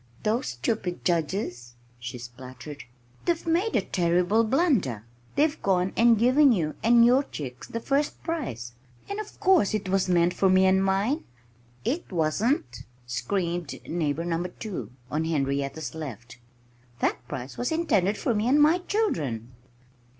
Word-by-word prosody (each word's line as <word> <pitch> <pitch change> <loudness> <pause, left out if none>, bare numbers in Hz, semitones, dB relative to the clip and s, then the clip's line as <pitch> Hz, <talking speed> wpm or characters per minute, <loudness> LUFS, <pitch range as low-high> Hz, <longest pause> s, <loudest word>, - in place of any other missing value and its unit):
"Those 225 +4 0
stupid 175 - -3
judges!" 155 - -1 0.2
she 120 +1 -6
spluttered. 125 +4 -10 0.4
"They've 340 -1 0
made 345 +7 +1
a - - +4
terrible 180 +5 +2
blunder. 220 - +1 0.3
They've 300 +1 +2
gone 185 -1 +1
and 230 -1 +5
given 255 +5 +5
you 165 -9 0
and 235 +1 +6
your 250 +3 +5
chicks 130 - -7
the 230 - -4
first 280 +5 -1
prize. 120 - -4 0.3
And 400 +1 -4
of 430 - -8
course 365 - +4
it 200 -3 -3
was 190 -1 +1
meant 175 0 +3
for 190 - +2
me 185 0 +5
and 190 0 +4
mine!" 200 +10 +1 0.6
"It 280 +6 -2
wasn't!" 160 - 0 0.2
screamed 170 +5 -2
Neighbor 165 -1 -1
Number 175 +1 -1
2 180 - -6 0.2
(on 155 +2 0
Henrietta's 140 -1 -1
left). 120 -6 -8 0.6
"That - - 0
prize 125 +2 -6
was 245 - -1
intended 215 - +1
for 240 - 0
me 215 +2 0
and 280 +4 +4
my 310 +4 +5
children!" 150 - -1
185 Hz, 145 wpm, -26 LUFS, -, 0.6 s, and